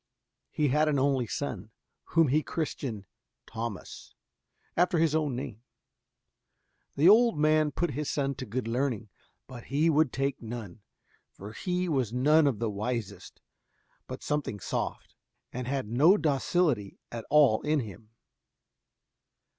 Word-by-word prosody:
He 150 -2 0
had 150 +3 +3
an 145 - +1
only 135 -3 +1
son, 110 -6 -4 0.4
whom 165 -4 +3
he 150 +4 +3
christened 135 -10 -4 0.4
Thomas, 115 -5 -7 0.6
after 175 0 +2
his 160 -2 +2
own 150 -5 0
name. 115 -3 -6 1.3
The 150 +5 +4
old 230 0 +6
man 155 0 +3
put 175 +3 -1
his 145 +2 -3
son 140 -1 -1
to 130 - -6
good 120 +3 -3
learning, 115 -3 -1 0.4
but 125 -3 -11
he 150 +5 +2
would 155 -3 +3
take 135 +1 -2
none, 110 -4 -7 0.5
for 100 +2 -10
he 180 +3 -2
was 130 -9 0
none 145 +5 +4
of 130 -6 0
the 115 0 -2
wisest, 105 -3 -5 0.7
but - - -7
something 145 -8 -2
soft, - - -4 0.4
and 125 0 -4
had 135 -4 -2
no 150 - +5
docility 145 - 0
at 115 -1 -5
all 145 -8 +5
in 150 -1 +1
him. 110 -1 -10
135 Hz, 140 wpm, -29 LUFS, 115-155 Hz, 1.3 s, old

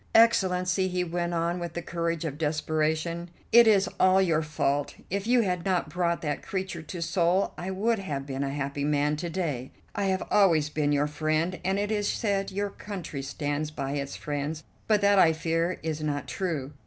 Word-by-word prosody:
"Excellency," 185 -4 +4
he 180 -1 -1
went 175 0 -2
on 170 +1 0
with 170 -1 -5
the 175 - -3
courage 170 -1 -2
of 150 -1 -4
desperation, 155 +2 -1 0.2
"it 235 0 +8
is 200 -3 +5
all 185 +1 +5
your 165 -5 +3
fault. 145 -2 -1 0.2
If 200 +2 -2
you 245 0 +5
had 180 -5 -1
not 185 -5 0
brought 170 0 0
that 150 -2 -2
creature 190 -3 -4
to 170 +2 -5
Seoul, 175 +2 +1
I 180 - -5
would 215 +4 +1
have 145 -8 -4
been 135 0 -3
a 140 - -1
happy 140 0 -3
man 150 0 +2
to 170 +2 -3
day. 150 -8 -2 0.2
I 200 - -1
have 190 -1 0
always 165 -7 +4
been 150 -1 +1
your 145 0 +2
friend, 155 +4 -1
and 190 +1 +1
it 205 +1 -1
is 205 -1 0
said 200 -3 -1
your 200 +1 -2
country 180 -10 -6
stands 145 +2 -2
by 140 -3 -4
its 140 -1 -3
friends; 150 +1 -4 0.2
but 210 -2 +3
that, 200 -1 +5
I 160 -3 +6
fear, 165 +2 -1
is 160 -1 -2
not 145 -2 -2
true. 155 -7 -3
170 Hz, 195 wpm, -27 LUFS, 150-190 Hz, 0.2 s, it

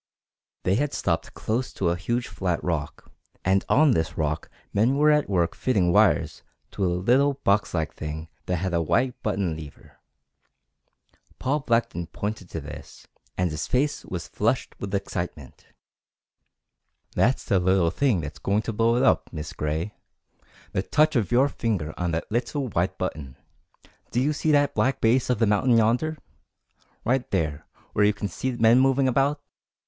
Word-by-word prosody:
They 95 +2 +2
had 145 +2 -1
stopped - - -1
close 120 +4 -2
to 90 - 0
a 85 - +1
huge 120 +8 -2
flat 90 -3 -2
rock, 80 -4 -3 0.3
and 95 +1 +3
on 150 +1 +5
this 80 -8 -1
rock 75 0 -2 0.2
men 115 +7 +2
were 150 +1 +5
at 150 -5 +2
work 85 -4 +1
fitting 95 -9 +1
wires - - +3 0.3
to 100 - -3
a - - +3
little 130 +9 +3
boxlike 95 -5 +1
thing 80 +1 -6 0.2
that 90 - +1
had 90 +1 -2
a 85 - +2
white 125 +10 0
button 95 -6 -1
lever. 75 -3 -12 1.4
Paul 145 +4 0
Blackton 115 - 0
pointed 100 -1 -5
to 80 - -4
this, 75 -1 -10 0.3
and 90 -2 +1
his 80 +2 -3
face 140 +10 0
was 90 -2 -6
flushed 115 +5 -1
with 100 0 -3
excitement. 90 -7 -5 1.5
"That's 130 +3 +2
the 95 - +2
little 90 -2 +2
thing 120 -6 +1
that's 75 -1 -7
going 100 +2 0
to 115 - -3
blow 115 +2 +2
it 125 - +2
up, - - +2
Miss 75 -2 -6
Gray 80 +7 -2 0.8
the 95 - 0
touch 155 +8 +2
of 115 -3 +1
your 130 +3 +5
finger 100 - -2
on 90 -1 -2
that 80 +3 -3
little 120 +3 -1
white 95 -1 -1
button. 75 -7 -5 0.7
Do 120 - 0
you 145 +4 +2
see 155 +1 0
that 145 -1 +3
black 120 +5 +1
base 120 +3 +2
of 125 - +2
the 115 - +3
mountain 115 +4 +3
yonder? 125 +8 +2 0.9
right 125 +2 +1
there 80 -5 -2 0.3
where 105 - +3
you 105 +1 +4
can 100 0 -4
see 130 +9 -3
men 115 +1 +5
moving 135 0 +3
about? 140 +3 +2
105 Hz, 165 wpm, -25 LUFS, 85-125 Hz, 1.5 s, on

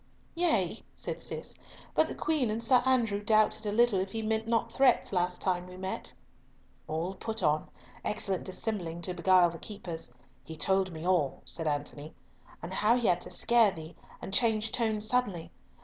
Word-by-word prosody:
"Yea," 230 - +1 0.2
said - - -4
Cis, - - -4 0.3
"but - - +3
the - - -6
Queen 300 -7 0
and 220 +2 -2
Sir 245 +1 +5
Andrew 230 -6 +2
doubted 215 0 +2
a - - 0
little 230 -2 +3
if 190 +1 -3
he 225 0 -2
meant 220 +1 -1
not 230 0 +1
threats 255 -4 +3
last 180 -1 0
time 180 -1 0
we 180 0 -11
met." 190 0 -4 0.8
"All 165 +4 -2
put 220 +3 -4
on—excellent 185 +5 -2
dissembling 185 -4 -4
to 180 - -3
beguile 180 -1 +4
the 165 - -9
keepers. 170 - -7 0.3
He 160 +4 -8
told 190 +4 +2
me 160 0 -7
all," 175 -7 +1
said 165 -2 -3
Antony, 145 +1 -4 0.5
"and 175 +2 -5
how 215 +4 +3
he 240 - -1
had 180 -3 +3
to - - -8
scare 235 -3 +4
thee 160 -3 -9 0.3
and 195 - -6
change 220 -1 +2
tone 220 -3 0
suddenly. 215 -6 0
195 Hz, 175 wpm, -30 LUFS, 175-225 Hz, 0.8 s, Sir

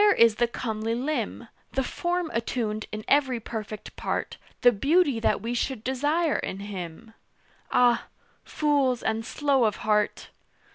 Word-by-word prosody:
"Where 415 -1 +6
is 230 -6 +5
the 240 - +3
comely 225 -1 -2
limb, 245 -3 -2 0.3
The 265 - +1
form 345 +4 -2
attuned 225 -2 -2
in 215 0 -6
every 270 -4 +3
perfect 215 -1 -7
part, - - -3 0.2
The 245 - +7
beauty 280 - +2
that 225 - +1
we 230 +3 -3
should 245 -1 -2
desire 290 +6 +1
in 190 - -4
him?" 200 +2 -7 0.6
Ah! 245 -1 +4 0.4
Fools 285 -5 +1
and 220 0 0
slow 275 0 +2
of 210 -2 +1
heart! 210 -1 +1
240 Hz, 145 wpm, -26 LUFS, 215-280 Hz, 0.6 s, The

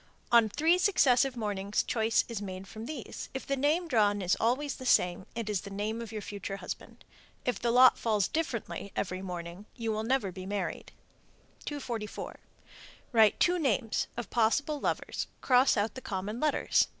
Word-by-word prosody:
On 230 -2 +6
three 325 - +3
successive 270 - +3
mornings 205 -2 -1
choice 225 0 +1
is 230 -4 -4
made 190 -1 -6
from 220 +3 -8
these. 300 -6 -6
If 265 - -4
the 275 - 0
name 300 +6 +1
drawn 210 -7 +3
is 180 - +2
always 255 +5 0
the 260 - -8
same, 180 -3 +3
it 230 -2 -3
is 210 -4 0
the 200 - -8
name 210 +3 -3
of 230 -2 -7
your 215 -2 -5
future 200 -1 -5
husband. - - -8 0.4
If 250 - 0
the 235 - 0
lot 250 +2 +7
falls 215 -4 +1
differently 235 -9 -3
every 185 -1 -2
morning, 180 +1 -7
you 225 -2 -2
will 215 0 -1
never 225 -4 0
be 185 +1 -8
married. 200 0 -3 0.7
244. 240 -7 -5 0.7
Write 220 -4 +5
two 355 0 +3
names 245 -6 0
(of 240 - -5
possible 285 +6 +2
lovers), - - -2
cross 255 -1 +4
out 205 +1 0
the 260 - -8
common 205 +1 -4
letters. 305 +1 +2
225 Hz, 175 wpm, -30 LUFS, 205-260 Hz, 0.7 s, lot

